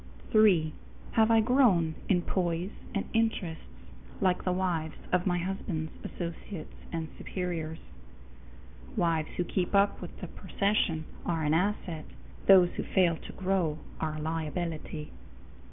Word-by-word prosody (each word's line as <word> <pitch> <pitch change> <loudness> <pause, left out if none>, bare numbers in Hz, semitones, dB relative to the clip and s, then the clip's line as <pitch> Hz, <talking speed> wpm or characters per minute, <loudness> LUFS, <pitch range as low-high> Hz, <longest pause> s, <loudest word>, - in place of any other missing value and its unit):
3. 185 -8 +5 0.4
Have 220 0 +4
I 225 -1 +6
grown 215 -10 +4 0.2
in 180 -3 +3
poise 175 +1 -1 0.2
and 200 - 0
interests 220 -8 0 0.5
like 180 -1 +2
the 185 - +1
wives 175 -4 -1 0.2
of 180 +1 +2
my 180 -1 +2
husband's 175 -3 -3
associates 170 0 -6 0.2
and 165 -1 -2
superiors? 165 -4 -3 1.2
Wives 165 -3 +2
who 180 - +2
keep 180 +2 -1
up 200 +1 +4
with - - -8
the - - -5
procession 195 -6 0 0.2
are 165 -2 0
an 150 0 +2
asset; 175 -3 0 0.4
those 185 -3 +8
who - - 0
fail 180 -3 +3
to - - -10
grow 185 -5 0 0.2
are 155 -1 -1
a - - -5
liability. 160 -1 -3
175 Hz, 135 wpm, -30 LUFS, 160-195 Hz, 1.2 s, those